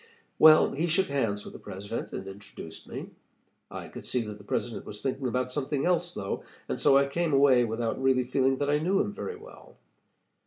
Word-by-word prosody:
"Well, 155 0 +8
he 160 +5 -1
shook 180 +2 +2
hands 115 -8 0
with - - -9
the - - -10
President, 100 +4 -6
and 95 - -5
introduced 95 -4 -10
me. - - -7 0.6
I - - -7
could - - -10
see 125 - 0
that 105 -1 -8
the - - -13
President 115 +3 -3
was 105 - -7
thinking 135 +1 -2
about 125 +1 -1
something 140 0 -1
else, 175 0 +1
though, 100 -1 -4 0.2
and - - -3
so 135 - +6
I 140 - +4
came 160 +3 -1
away 135 -3 +5
without 115 +2 -2
really 130 -1 +3
feeling 130 +1 +1
that 145 +1 -1
I 150 - +3
knew 185 +5 +1
him 205 0 0
very 450 - -5
well. 440 +4 -14
135 Hz, 205 wpm, -28 LUFS, 115-155 Hz, 0.6 s, Well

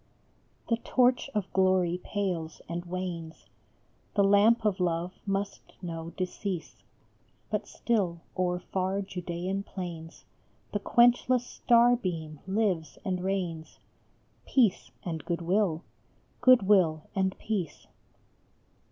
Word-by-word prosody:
The 230 - +2
torch 250 +3 +2
of 205 -3 -2
glory 185 -2 +2
pales 180 -6 -3
and 170 +1 -4
wanes, 175 -3 -5 0.7
The 200 - +4
lamp 210 +3 +5
of 205 -3 +1
love 175 0 0
must 195 0 -3
know 165 -2 -5
decease, 185 -1 -4 0.7
But - - -1
still 190 -8 -1
o 185 -1 +1
er 180 0 -1
far 190 +2 -1
Judaean 180 +1 -3
plains 175 -4 -7 0.5
The 205 - -1
quenchless 245 +3 +4
star 240 0 +4
beam 160 - -4
lives 190 -7 0
and 185 -2 -1
reigns, 175 -5 -3 0.7
Peace 235 -8 +2
and 165 -3 -4
Good 170 -1 -2
will: 180 -2 +1 0.6
Good 255 -3 +7
will 175 -6 +4
and 190 -2 0
Peace. 190 -9 -3
185 Hz, 115 wpm, -29 LUFS, 170-205 Hz, 0.7 s, Good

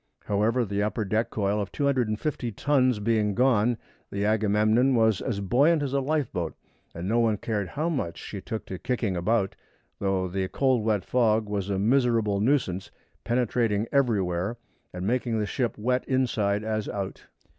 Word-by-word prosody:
However, 110 +4 +1
the 100 0 -2
upper 105 +1 -1
deck 110 +4 0
coil 105 0 0
of 100 - -5
250 130 -2 -1
tons 130 0 +2
being 105 -1 +1
gone, 120 -2 +3 0.3
the 100 +1 -1
Agamemnon 110 +4 +3
was 110 -4 +3
as 100 -4 -2
buoyant 145 - +3
as 135 -1 -3
a 140 - +2
lifeboat, 135 - -1 0.4
and 85 +2 -4
no 115 +3 +2
one 110 -2 +2
cared 105 -2 -2
how 150 - -2
much 130 - -2
she 100 - -7
took 110 +2 -5
to 95 - -6
kicking 115 -6 -1
about, 95 +2 0 0.4
though 95 -2 0
the 95 +1 -2
cold 130 0 +1
wet 105 -3 0
fog 110 -3 +2
was 100 -1 -2
a 100 - 0
miserable 115 -2 +2
nuisance, 105 -6 0 0.3
penetrating 115 -3 +1
everywhere 105 -6 +1 0.3
and 90 +1 -5
making 120 +1 0
the 105 - 0
ship 120 +2 -1
as 105 - -11
wet 125 +1 +1
inside 110 -6 +1
as 110 -1 -2
out. 100 -2 -5
110 Hz, 165 wpm, -26 LUFS, 100-125 Hz, 0.4 s, gone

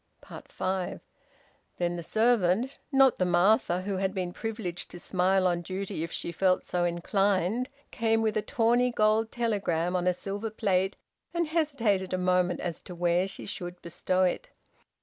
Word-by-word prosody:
FIVE. 185 -1 -2 0.8
Then 175 0 0
the 170 - -4
servant 225 +3 +2
not 270 -2 +5
the - - +3
Martha 180 0 +3
who 195 0 -2
had 190 +1 -1
been 180 -2 -2
privileged 210 -6 -5
to 175 - -9
smile 185 +1 +1
on 175 -1 +1
duty 190 0 -4
if 165 - -5
she - - -4
felt 185 +2 +1
so 175 -1 0
inclined 195 +6 +1 0.2
came 225 -1 +1
with 220 -1 0
a 215 - +2
tawny 240 0 +2
gold 220 0 +2
telegram 190 -7 0
on 180 0 0
a 180 - +4
silver 200 +4 -4
plate, 195 -2 0 0.4
and 340 0 +2
hesitated 235 - 0
a - - +1
moment 180 -1 +1
as 170 -3 -4
to 180 - -9
where 175 +2 +2
she 195 - -7
should 175 -2 -6
bestow 185 +2 0
it. 180 - -1
190 Hz, 165 wpm, -28 LUFS, 180-220 Hz, 0.8 s, not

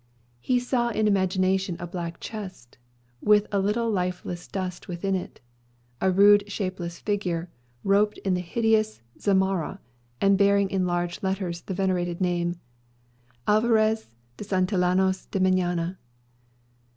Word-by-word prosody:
He 250 - +1
saw 245 -1 0
in 215 -1 +1
imagination 190 -1 +1
a 175 - -4
black 170 -1 -5
chest, 185 - -8 0.4
with 210 0 +4
a 200 - +1
little 210 +4 0
lifeless 180 -2 -3
dust 185 -2 -5
within 185 +2 -2
it; 185 - -4 0.6
a 190 - +3
rude 205 +2 +5
shapeless 185 -4 -4
figure, 180 -5 -2 0.3
robed 205 +2 +3
in 190 - +2
the 180 - 0
hideous 215 - +1 0.2
zamarra, 190 -4 +1 0.4
and 195 0 +3
bearing 200 -1 +3
in 190 -2 +1
large 175 0 -2
letters 190 -3 -2
the 190 - -5
venerated 180 -2 0
name, 175 -1 0 0.9
"Alvarez 220 - +3 0.3
de - - -6
Santillanos 185 -1 +1
y - - +2
Meñaya." 180 -1 +1
190 Hz, 125 wpm, -26 LUFS, 180-205 Hz, 0.9 s, rude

